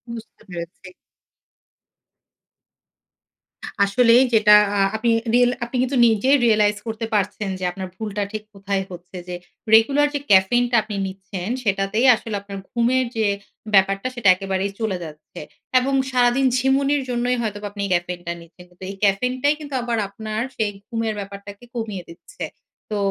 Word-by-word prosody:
বুঝতে 225 Hz, -1 st, -12 dB
পেরেছি। 175 Hz, +2 st, -8 dB, 3.0 s
আসলেই 235 Hz, +4 st, +5 dB
যেটা 210 Hz, -1 st, +7 dB, 0.2 s
আ -, -, +2 dB, 0.2 s
আপনি 230 Hz, +1 st, +1 dB, 0.2 s
রিল 245 Hz, 0 st, +5 dB
আপনি 235 Hz, +2 st, -6 dB
কিন্তু 260 Hz, +1 st, -1 dB
নিজেই 245 Hz, +6 st, +3 dB
রিয়ালাইজ 210 Hz, -2 st, +3 dB
করতে 225 Hz, +1 st, -3 dB
পারছেন 205 Hz, 0 st, -1 dB
যে -, -, -6 dB
আপনার 190 Hz, +1 st, -6 dB
ভুলটা 210 Hz, 0 st, -3 dB
ঠিক 215 Hz, -1 st, -5 dB
কোথায় 195 Hz, -1 st, -2 dB
হচ্ছে 180 Hz, +1 st, -10 dB
যে 180 Hz, -, -4 dB, 0.4 s
regular 280 Hz, +6 st, +4 dB
যে -, -, 0 dB
caffeine 200 Hz, +6 st, +5 dB
টা -, -, +2 dB
আপনি 210 Hz, -1 st, -6 dB
নিচ্ছেন 190 Hz, 0 st, -7 dB
সেটাতেই 195 Hz, +3 st, +1 dB
আসলে 220 Hz, -1 st, -6 dB
আপনার 200 Hz, -1 st, -8 dB
ঘুমের 245 Hz, +2 st, +2 dB
যে 220 Hz, -2 st, +1 dB, 0.5 s
ব্যাপারটা 195 Hz, +3 st, +3 dB
সেটা 230 Hz, -6 st, +3 dB
একেবারেই 195 Hz, +1 st, -2 dB
চলে 220 Hz, -5 st, -1 dB
যাচ্ছে 155 Hz, -2 st, -11 dB, 0.4 s
এবং 270 Hz, +2 st, -1 dB, 0.2 s
সারাদিন 250 Hz, +1 st, +3 dB
ঝিমুনির 275 Hz, +2 st, +2 dB
জন্যই 245 Hz, 0 st, 0 dB
হয়তোবা 205 Hz, -2 st, -4 dB
আপনি 200 Hz, 0 st, -5 dB
caffeine 175 Hz, 0 st, -2 dB
টা 170 Hz, -, -1 dB
নিচ্ছেন। 170 Hz, +2 st, -16 dB
কিন্তু 180 Hz, +1 st, -16 dB
এই 195 Hz, -, -6 dB
caffeine 250 Hz, +6 st, +2 dB
টাই 290 Hz, +1 st, +4 dB
কিন্তু 290 Hz, -2 st, -9 dB
আবার 235 Hz, -1 st, -2 dB
আপনার 215 Hz, +2 st, -5 dB, 0.2 s
সেই 215 Hz, -2 st, 0 dB, 0.2 s
ঘুমের 225 Hz, -2 st, -2 dB
ব্যাপারটাকে 200 Hz, +1 st, -9 dB
কমিয়ে 215 Hz, -6 st, -4 dB
দিচ্ছে। 180 Hz, -, -10 dB, 0.5 s
তো 210 Hz, -, -1 dB
210 Hz, 150 wpm, -22 LUFS, 195-240 Hz, 3.0 s, যেটা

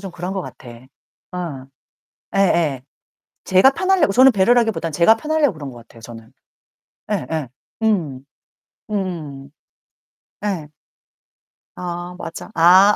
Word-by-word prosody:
좀 195 Hz, -2 st, -7 dB
그런 180 Hz, +2 st, -5 dB
것 195 Hz, -, -2 dB
같아. 125 Hz, -, -11 dB, 0.6 s
어. 155 Hz, -8 st, -5 dB, 0.7 s
예예. 170 Hz, -9 st, +2 dB, 0.6 s
제가 190 Hz, +9 st, +5 dB
편하려고, 370 Hz, -, +2 dB
저는 260 Hz, +5 st, +7 dB
배려라기보다는 225 Hz, -4 st, +2 dB
제가 170 Hz, +8 st, +5 dB
편하려고 305 Hz, -, +1 dB
그런 145 Hz, -3 st, -7 dB
것 120 Hz, -, -12 dB
같아요, 115 Hz, 0 st, -16 dB
저는. 115 Hz, +1 st, -12 dB, 0.8 s
예예. 160 Hz, -, -2 dB, 0.3 s
음. 160 Hz, -12 st, 0 dB, 0.6 s
음음. 160 Hz, -9 st, -4 dB, 0.9 s
예. 180 Hz, -7 st, -2 dB, 1.1 s
아 175 Hz, 0 st, -6 dB
맞아. 165 Hz, +6 st, -8 dB
아. 185 Hz, +5 st, +7 dB
180 Hz, 220 characters per minute, -20 LUFS, 145-205 Hz, 1.1 s, 저는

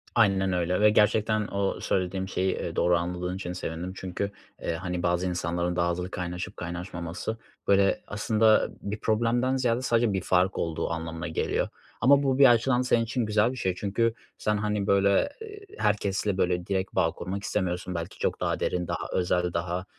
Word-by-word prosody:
Aynen 95 Hz, -4 st, +3 dB
öyle 90 Hz, +2 st, 0 dB
ve 105 Hz, -, +7 dB
gerçekten 105 Hz, 0 st, +2 dB
o 100 Hz, 0 st, -1 dB
söylediğim 95 Hz, 0 st, -1 dB
şeyi, 95 Hz, -1 st, 0 dB
ııı, -, -, -4 dB
doğru 90 Hz, 0 st, +3 dB
anladığın 90 Hz, +1 st, -3 dB
için 90 Hz, -2 st, -5 dB
sevindim. 90 Hz, +1 st, -5 dB
Çünkü, 95 Hz, +2 st, -4 dB, 0.3 s
eee, -, -, -1 dB
hani, 90 Hz, +1 st, -3 dB
bazı 90 Hz, +1 st, +1 dB
insanların 85 Hz, 0 st, -1 dB
daha 85 Hz, 0 st, +2 dB
hızlı 90 Hz, +2 st, -4 dB
kaynaşıp 90 Hz, +1 st, -5 dB
kaynaşmaması 85 Hz, +4 st, -5 dB, 0.3 s
böyle 100 Hz, 0 st, +3 dB
aslında 110 Hz, +1 st, +3 dB
bir 105 Hz, +1 st, -4 dB
problemden 120 Hz, +4 st, +1 dB
ziyade 125 Hz, -1 st, +1 dB
sadece 115 Hz, -4 st, +2 dB
bir 95 Hz, -, 0 dB
fark 90 Hz, +1 st, +2 dB
olduğu 80 Hz, -1 st, -2 dB
anlamına 80 Hz, +1 st, -4 dB
geliyor 80 Hz, -, -1 dB, 0.3 s
ama 140 Hz, +3 st, +6 dB
bu 135 Hz, -1 st, +1 dB
bir 140 Hz, -, +9 dB
açıdan 120 Hz, +2 st, +3 dB
senin 120 Hz, -2 st, +2 dB
için 115 Hz, +1 st, -1 dB
güzel 105 Hz, +2 st, +2 dB
bir 130 Hz, -, -7 dB
şey 95 Hz, -6 st, -1 dB
çünkü 110 Hz, +4 st, 0 dB, 0.2 s
sen, 105 Hz, 0 st, 0 dB
hani, 105 Hz, -1 st, -1 dB
böyle, 100 Hz, 0 st, +4 dB
ııı, 100 Hz, -, +3 dB, 0.5 s
herkesle 100 Hz, -, 0 dB
böyle 90 Hz, -1 st, +1 dB
direkt 95 Hz, -1 st, -2 dB
bağ -, -, +3 dB
kurmak 95 Hz, +3 st, -5 dB
istemiyorsun, 90 Hz, -3 st, -2 dB
belki 85 Hz, +2 st, -5 dB
çok -, -, -1 dB
daha -, -, -1 dB
derin, 90 Hz, -1 st, -1 dB
daha -, -, -3 dB
özel, 90 Hz, -1 st, +1 dB
daha, 90 Hz, +2 st, -2 dB
95 Hz, 175 wpm, -27 LUFS, 90-110 Hz, 0.5 s, bir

